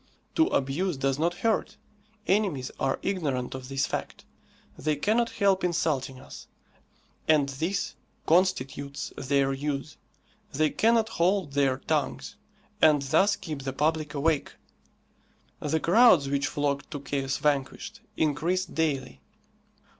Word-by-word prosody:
To 325 0 +4
abuse 145 +5 0
does 135 +1 0
not 170 +2 +1
hurt. 220 -1 0 0.5
Enemies 185 -11 0
are 135 0 0
ignorant 145 -10 -2
of 130 -1 -7
this 135 +1 0
fact. - - -5 0.5
They 150 +1 -1
cannot 225 +10 +1
help 195 -2 +1
insulting 145 -7 -1
us, - - -12 0.8
and 150 -3 +4
this 165 +9 -2 0.3
constitutes 140 -5 0
their 135 0 +1
use. 145 +1 -4 0.6
They 155 +2 +2
cannot 225 0 +3
hold 180 -5 +1
their 135 -2 +2
tongues, 150 +1 -2 0.5
and 150 -3 +5
thus 160 +9 +3
keep 155 -6 -6
the 135 0 -4
public 155 0 0
awake. 150 +1 0 1.1
The 155 +2 0
crowds 180 - +5
which 140 0 0
flocked 145 -1 -2
to 145 - -5
"Chaos 135 -1 -2
Vanquished" 150 +10 -2 0.2
increased 165 +5 0
daily. 140 -5 -1
150 Hz, 125 wpm, -27 LUFS, 135-180 Hz, 1.1 s, and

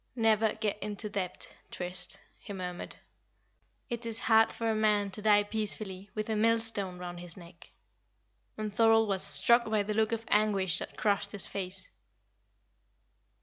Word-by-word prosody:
"Never 220 -2 +2
get 215 -1 -3
into 210 +1 -2
debt, 185 -3 -5
Trist," 180 +2 0 0.2
he 205 - -9
murmured. 180 -2 -5 0.9
"It 235 0 -4
is 230 -1 -3
hard 225 -1 +4
for 230 -1 -2
a - - -1
man 210 -2 +2
to 210 - -5
die 205 -1 +5
peacefully 205 -2 -4
with 215 -1 -3
a 220 - -1
millstone 225 -4 +1
round 175 -1 -7
his 175 0 -8
neck." 170 -1 -14 0.9
And 215 -1 -4
Thorold 225 0 +4
was 190 -2 +1
struck 235 - +3
by 215 -1 +1
the 210 +1 -3
look 220 +1 +1
of 230 0 -3
anguish 205 -4 +2
that - - -7
crossed 205 0 0
his 200 - +4
face. 185 -1 -5
210 Hz, 155 wpm, -30 LUFS, 190-220 Hz, 0.9 s, die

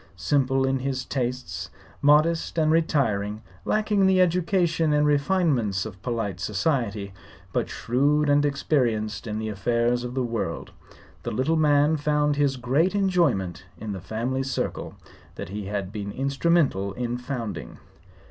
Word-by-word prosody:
Simple 135 +6 +1
in 135 0 +1
his 130 0 -2
tastes, 120 -10 -3 0.3
modest 155 +4 +3
and 155 -1 +3
retiring, 110 -10 +1 0.2
lacking 210 -2 +2
the 190 -1 +4
education 170 -3 +2
and 150 0 +3
refinements 140 - +1
of 95 -3 -9
polite 110 -6 -3
society, 105 - -1 0.4
but - - 0
shrewd 145 +5 +1
and 145 0 +4
experienced 120 -7 0
in 105 0 -3
the 110 0 -3
affairs 120 +4 0
of 125 +1 -5
the 130 - 0
world, 115 -8 -3 0.5
the - - -4
little 130 +9 0
man 150 0 +3
found 150 0 +1
his 140 -2 +1
greatest 140 - +1
enjoyment 165 - +1
in 110 -1 -6
the 95 -2 -5
family 120 +7 -2
circle 135 0 -3 0.4
that - - -7
he 100 0 -5
had 100 -2 -3
been 100 -2 -5
instrumental 135 - +1
in 120 +2 -3
founding. 125 -5 -5
130 Hz, 140 wpm, -25 LUFS, 110-150 Hz, 0.5 s, the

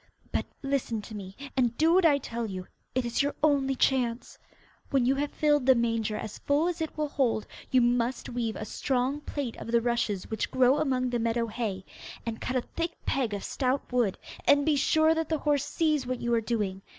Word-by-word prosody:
But - - -1 0.2
listen 270 -6 -1
to 220 - -10
me, 195 -2 -8 0.2
and 245 -3 +1
do 325 +2 +4
what 365 -2 +6
I 290 -3 +4
tell 235 -4 -4
you. 185 -2 -5 0.3
It 255 -1 +1
is 235 +3 +1
your 285 +1 -1
only 275 -3 +3
chance. 250 -2 0 0.5
When 270 -3 +2
you 260 - +4
have 285 +1 -1
filled 295 -3 +2
the 260 - +7
manger 230 -2 0
as 215 -1 -6
full 290 +4 +2
as 345 -2 -2
it 320 - -4
will 305 -1 0
hold 250 -7 +1 0.2
you 255 - +4
must 240 +1 +1
weave 235 -2 -2
a 215 - -5
strong 260 +4 -1
plait 280 -5 -4
of - - -8
the 235 - +5
rushes 230 -5 -1
which 220 - -1
grow 260 +2 +4
among 255 -4 0
the 240 - 0
meadow 230 +1 +1
hay, 210 -5 -4 0.4
and 225 -1 -4
cut 255 - -2
a 255 - +2
thick 335 +6 -4
peg 255 -5 0
of 200 - -5
stout 260 -1 -1
wood, 235 -6 +2 0.3
and 285 0 +5
be 310 -1 +3
sure 315 +3 +4
that 325 -1 -2
the 320 - +1
horse 290 -1 +1
sees 305 -5 0
what 255 -1 -2
you 235 0 -1
are 230 - +3
doing. 210 -4 -2
255 Hz, 215 wpm, -28 LUFS, 230-285 Hz, 0.5 s, the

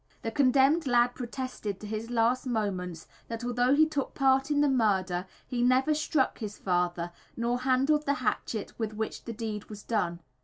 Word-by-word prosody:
The 225 - -2
condemned 275 +5 +4
lad 245 0 +4
protested, 245 -5 -5
to - - -9
his 215 +2 -4
last 245 +2 +1
moments, 185 -8 -2 0.2
that 230 +1 -5
although 245 +2 +2
he 315 +2 +6
took 295 -3 -3
part 270 0 +3
in 290 -1 +2
the 295 - +4
murder, 190 -8 +1 0.2
he 245 -1 -2
never 255 +4 +4
struck 300 -2 0
his 210 -3 -5
father 175 -1 -1 0.3
nor 240 +1 0
handled 270 +4 +2
the 280 - +3
hatchet 225 -3 -2
with 220 -1 -2
which 220 0 -4
the 230 - -4
deed 215 -2 -4
was 210 -1 -9
done. 175 -7 -1
240 Hz, 180 wpm, -29 LUFS, 210-265 Hz, 0.3 s, he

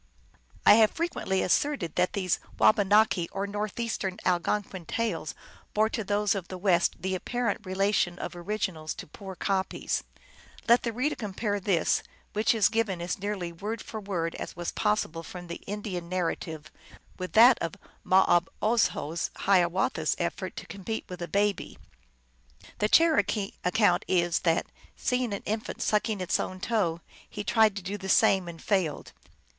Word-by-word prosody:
I - - +9
have 215 - +6
frequently 320 - -1
asserted 205 - +1
that 180 0 +1
these 185 -4 0 0.2
Wabanaki 205 -4 +4
or 195 +1 -2
Northeastern 205 -1 -3
Algonquin 185 0 -1
tales 190 -10 -2 0.4
bore 215 +1 +3
to 225 -1 -3
those 205 0 +1
of 190 -4 -4
the 185 - -6
West 180 -2 +2
the 190 0 -1
apparent 235 +4 -2
relation 190 -2 +1
of - - -6
originals 175 -4 -3
to - - -8
poor 190 +4 -9
copies. 190 +1 -1 0.6
Let 235 +1 +6
the 235 - -2
reader 255 +7 0
compare 205 -1 -2
this, 185 -4 +1 0.3
which 215 +2 +2
is 210 -4 +5
given 220 -4 0
as 175 +4 -3
nearly 195 -3 -3
word 205 +7 -5
for 220 - -7
word 180 -5 -2
as - - -6
was 175 0 -3
possible 210 -6 0
from 175 +1 -9
the 170 0 -7
Indian 195 -4 -4
narrative, 165 -3 -3 0.5
with 185 0 -5
that 235 +3 +7
of 165 - -3 0.3
Mauobozho 185 -1 +2
Hiawatha 180 -3 +2
s 155 - +1
effort 175 +1 -3
to - - -7
compete 200 +3 -5
with 180 -1 -7
a 175 - -3
baby. 205 +1 0 1.0
The 210 - +2
Cherokee 300 -11 +3
account 205 +4 +3
is 175 -2 +2
that, 165 -1 +1 0.3
seeing 250 -2 0
an 200 - -4
infant 220 +1 -3
sucking 210 -1 0
its 185 - +1
own 185 0 -4
toe, 185 -6 0 0.3
he 210 - -5
tried 215 +1 +3
to 200 - -5
do 200 +3 -4
the 190 0 -6
same, 190 -1 +4
and 170 -1 -8
failed. 185 -7 -1
195 Hz, 155 wpm, -28 LUFS, 175-215 Hz, 1.0 s, I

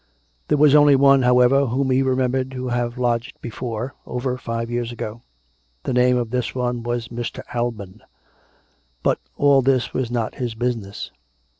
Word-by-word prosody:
There 150 - +2
was 145 -1 +5
only 145 -1 +7
one, 135 0 +5
however, 125 +2 +4
whom 130 +3 0
he 130 +1 +3
remembered 130 0 0
to 130 -1 -4
have 120 0 -2
lodged 120 -2 -1
before, 120 +1 -5
over 125 +1 -2
five 115 -2 -4
years 120 0 -2
ago. 115 -1 -6 0.6
The - - -2
name 125 0 +4
of 120 -2 -2
this 125 -1 -2
one 125 -1 -1
was 120 -1 -3
Mr. 120 0 -5
Alban. 115 -6 -4 1.0
But - - +2 0.2
all 140 -1 +5
this? 130 -1 +1
was 130 -3 -1
not 120 -2 -2
his 120 -2 -2
business. 115 -4 -3
125 Hz, 160 wpm, -22 LUFS, 120-130 Hz, 1.0 s, only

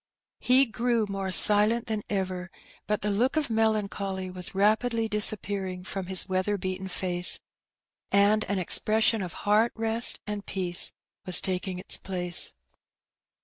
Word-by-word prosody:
He 260 +2 +3
grew 235 -1 -1
more 195 -1 -4
silent 210 +4 +5
than 215 -2 -3
ever; 185 -2 -3 0.4
but 210 -1 -2
the 210 - 0
look 245 +9 0
of 295 -6 -1
melancholy 200 -4 -2
was 180 0 -5
rapidly 225 +3 +1
disappearing 200 -3 -1
from 190 0 -6
his 185 -1 +1
weather 190 +2 -1
beaten 185 0 -5
face, 180 -1 +2 0.7
and 205 +2 +3
an 200 0 -2
expression 215 +4 +2
of 180 -3 -6
heart 215 +3 +3
rest 225 +1 +3
and 210 -1 -5
peace 180 -3 -3 0.4
was 180 - +7
taking 185 0 -4
its 185 - -3
place. 180 -3 -4
200 Hz, 140 wpm, -26 LUFS, 185-220 Hz, 0.7 s, was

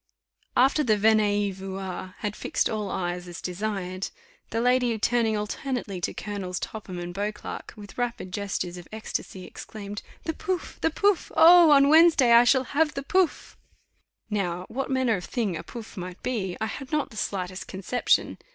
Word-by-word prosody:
After 270 +4 +4
the 215 -5 +3
venez 205 -2 +2
y - - -8
voir 190 -1 -6
had 210 -1 -2
fixed - - 0
all 215 -2 -3
eyes 180 -1 -3
as 175 0 -8
desired, 185 0 -3 0.4
the 225 - -1
lady 245 -1 +2
turning 225 0 +1
alternately 210 -2 -3
to - - -1
Colonels 190 -4 -4
Topham 200 -4 -6
and 175 0 -5
Beauclerk, 205 +2 -5
with 205 +1 -11
rapid 235 -6 -3
gestures 195 -3 -3
of 175 - -10
ecstasy, 215 -3 -5
exclaimed, 205 -1 -8 0.2
"The 320 - -2
pouf! 375 0 -4
the 325 - +3
pouf! 400 +3 +1
Oh! 345 0 +9
on 280 -1 +7
Wednesday 310 -5 +6
I 235 +1 +8
shall 260 +1 +4
have 300 +3 +1
the 275 - -3
pouf!" 370 +3 0 0.7
Now 185 -4 -2
what 270 +3 -3
manner 260 -5 +2
of 180 - -7
thing 220 -8 -1
a 160 - -4
pouf! 235 -2 -9
might 180 -1 -7
be, 195 -8 -2
I 220 - 0
had 260 +5 -6
not 300 -2 0
the - - -12
slightest 185 -2 -3
conception. 200 +6 0
215 Hz, 170 wpm, -26 LUFS, 190-255 Hz, 0.7 s, Oh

